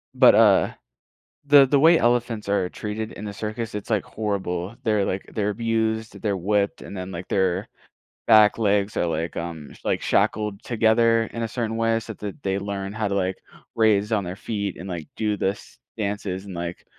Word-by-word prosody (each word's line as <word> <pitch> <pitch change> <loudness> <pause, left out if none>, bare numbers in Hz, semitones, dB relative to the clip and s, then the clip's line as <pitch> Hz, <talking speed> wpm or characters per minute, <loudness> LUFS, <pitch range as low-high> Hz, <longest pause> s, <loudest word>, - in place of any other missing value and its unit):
But, - - +7
uh, - - +5 0.7
the 140 -1 +8
the 140 +1 +3
way 165 +3 +7
elephants 120 -4 0
are 100 -2 +1
treated 110 +1 -5
in 105 - -9
the 100 - -5
circus, 110 +2 -4
it's, 105 +2 -6
like, 105 -4 +1
horrible. 100 -2 -3
They're, 105 -3 +2
like, 95 - -3
they're 105 -1 0
abused, 110 -1 -1
they're 100 -3 0
whipped, 100 +2 0
and - - -9
then, 95 0 -6
like, 85 0 -7
their 95 -2 0 0.6
back 110 -2 +6
legs 105 -2 +1
are, - - +2
like, 80 +1 -2
um, 85 -3 -6
like, - - 0
shackled 105 -2 0
together 115 0 +3
in 115 - -3
a - - -1
certain 115 -1 -3
way 115 0 +1
so 110 0 -8
that 105 +6 -8
they 95 0 0
learn 100 0 -4
how 110 -1 -1
to, 100 - -1
like, 95 -1 0 0.4
raise 105 -1 +3
on 105 -3 +1
their 90 +1 -5
feet 100 -3 -4
and, 90 - -8
like, 85 -4 -5
do 105 -1 0
this 95 +1 -3 0.2
dances 100 -2 -3
and, 100 - -8
like, 85 +1 -5
105 Hz, 190 wpm, -24 LUFS, 95-110 Hz, 0.7 s, the